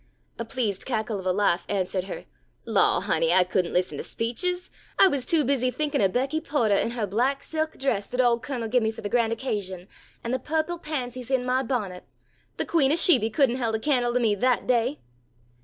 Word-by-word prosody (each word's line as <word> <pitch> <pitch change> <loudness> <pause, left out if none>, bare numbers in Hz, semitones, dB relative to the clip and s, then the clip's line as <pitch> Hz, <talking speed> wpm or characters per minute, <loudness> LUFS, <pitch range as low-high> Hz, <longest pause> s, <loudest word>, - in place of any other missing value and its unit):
A 230 - -3
pleased 225 -5 -2
cackle 220 -4 -2
of 185 - -5
a - - +3
laugh 180 -3 +1
answered 190 -2 -1
her. - - -7 0.4
"Law, - - +3
honey, - - +1
I 185 - +5
couldn't 180 -1 -1
listen 180 +1 -1
to - - -4
speeches! 355 +11 -2 0.3
I 390 - +7
was 280 -8 -2
too 325 -3 +3
busy 255 -1 +1
thinkin' 295 0 -1
of 195 -2 +3
Becky 270 +7 -1
Potah 235 -10 +1
in - - -1
her 230 -3 -1
black 250 +8 0
silk 315 0 -3
dress 235 -7 -1
that 250 - -5
ole 240 -2 +4
Cun'l 245 -2 -4
give 245 +2 +2
me 220 - +1
for 220 - -7
the 205 - -4
grand 230 -1 +2
occasion, 200 -6 -3 0.4
an' 235 - -3
the 260 - 0
purple 320 +5 -2
pansies 255 -6 -5
in 260 -2 +1
my 255 +1 +1
bonnet. 215 -8 -3 0.5
The - - -1
queen 285 -5 +2
o' - - +3
Sheby 290 -10 +4
couldn't 260 -1 +2
held 230 -3 -1
a - - -1
can'le 245 -2 +1
to - - +4
me 225 -4 +2
that 250 +5 +1
day." 230 - +1
245 Hz, 215 wpm, -25 LUFS, 210-275 Hz, 0.5 s, I